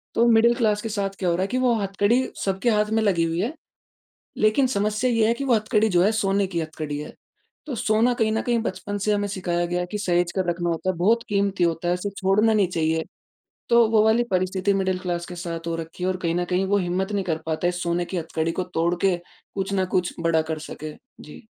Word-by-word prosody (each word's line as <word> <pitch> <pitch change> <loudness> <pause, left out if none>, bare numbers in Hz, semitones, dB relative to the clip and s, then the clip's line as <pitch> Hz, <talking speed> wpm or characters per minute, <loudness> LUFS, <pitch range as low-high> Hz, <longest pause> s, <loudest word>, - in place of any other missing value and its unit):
तो 230 - +4
middle 235 +1 +5
class 215 -3 +1
के 225 - -4
साथ 200 -2 -1
क्या 185 - 0
हो 170 - +2
रहा 180 - -1
है - - -1
कि 250 - -2
वो 240 - +4
हथकड़ी 205 +5 +1 0.2
सबके 195 +4 0
हाथ 210 -1 +2
में - - +1
लगी 185 -5 +2
हुई 165 +1 -1
है, 245 - -2 0.9
लेकिन 215 +5 +3
समस्या 215 +5 +1
ये 230 -2 +3
है 230 - +3
कि 275 - -4
वो 255 -3 +3
हथकड़ी 215 0 +2
जो 175 -4 +3
है 205 - +4
सोने 200 -2 +1
की 175 -3 -3
हथकड़ी 155 -2 -5
है, 150 - -8 0.5
तो 285 - -4
सोना 220 +3 +2
कहीं 220 -2 +1
न 220 - 0
कहीं 240 -1 +1
बचपन 205 0 -4
से 210 +2 0
हमें 205 0 0
सिखाया 175 -3 -1
गया 175 +1 -1
कि 210 - -2
सहेज 175 -3 +1
के 185 -2 -2
रखना 175 0 -2
होता 170 +3 -1
है, 185 - -4
बहुत 220 +7 +2
क़ीमती 200 -2 +1
होता 170 0 -1
है, 175 - +3
उसे 180 +3 -3
छोड़ना 205 +4 +3
नहीं 205 -4 +3
चाहिए। 160 -2 0 0.6
तो 235 -1 +5
वो 220 -1 +4
वाली 220 +2 +4
परिस्थिति 185 +1 +1
मिडल 190 -1 0
क्लास 175 -1 -3
के 180 - -8
साथ 170 -1 -5
हो 170 - -1
रखी 165 +2 -8
हैं - - +1
और 185 - -2
कहीं 165 -1 0
न 175 0 0
कहीं 180 +2 0
वो 205 +1 +3
हिम्मत 190 +2 -1
नहीं 200 -2 -1
कर 165 -3 -1
पाते 160 +2 0
इस 180 0 -3
सोने 175 0 0
की 185 - -5
हथकड़ी 160 0 -2
को 185 - -2
तोड़के 175 +3 +1 0.4
कुछ 195 0 -3
न 190 -1 +2
कुछ 180 -2 0
बड़ा 165 -1 +2
कर 155 - -3
सके। 155 0 -7 0.3
जी। 150 - -12
190 Hz, 245 wpm, -24 LUFS, 175-215 Hz, 0.9 s, मिडल